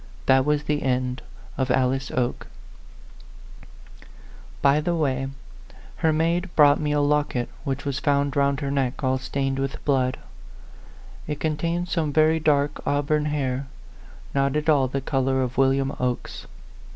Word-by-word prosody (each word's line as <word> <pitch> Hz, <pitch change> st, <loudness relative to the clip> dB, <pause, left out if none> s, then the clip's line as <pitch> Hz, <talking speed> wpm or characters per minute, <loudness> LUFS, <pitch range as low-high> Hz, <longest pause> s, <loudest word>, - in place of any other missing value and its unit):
That 130 Hz, 0 st, +4 dB
was 150 Hz, 0 st, +1 dB
the 150 Hz, 0 st, -1 dB
end 125 Hz, -1 st, -1 dB, 0.4 s
of 130 Hz, 0 st, 0 dB
Alice 130 Hz, +1 st, +1 dB
Oke. 125 Hz, -1 st, -2 dB, 2.1 s
By 140 Hz, +2 st, +3 dB
the 170 Hz, +2 st, 0 dB
way, 135 Hz, -4 st, 0 dB, 0.7 s
her 160 Hz, -, +2 dB
maid 170 Hz, +4 st, 0 dB
brought 145 Hz, -1 st, +6 dB
me 150 Hz, -1 st, -1 dB
a 145 Hz, -, +2 dB
locket 145 Hz, -4 st, 0 dB, 0.2 s
which 140 Hz, 0 st, -3 dB
was 140 Hz, -1 st, -2 dB
found 140 Hz, -1 st, +1 dB
round 140 Hz, 0 st, +1 dB
her 140 Hz, -1 st, -2 dB
.neck, 135 Hz, -1 st, -1 dB
all 130 Hz, 0 st, +1 dB
stained 135 Hz, 0 st, -2 dB
with 135 Hz, 0 st, -4 dB
blood. 130 Hz, -3 st, +1 dB, 1.1 s
It 150 Hz, -1 st, -4 dB
contained 165 Hz, +3 st, -1 dB
some 165 Hz, -4 st, -1 dB
very 155 Hz, +2 st, +3 dB
dark 145 Hz, -2 st, +1 dB
auburn 145 Hz, +1 st, 0 dB
hair, 140 Hz, -3 st, -2 dB, 0.7 s
not 140 Hz, 0 st, +1 dB
at 150 Hz, +1 st, 0 dB
all 140 Hz, -4 st, +4 dB
the 135 Hz, +2 st, -3 dB
color 130 Hz, -1 st, 0 dB
of 125 Hz, 0 st, -3 dB
William 135 Hz, +1 st, +2 dB
Oke's. 125 Hz, -1 st, -3 dB
140 Hz, 145 wpm, -24 LUFS, 130-150 Hz, 2.1 s, brought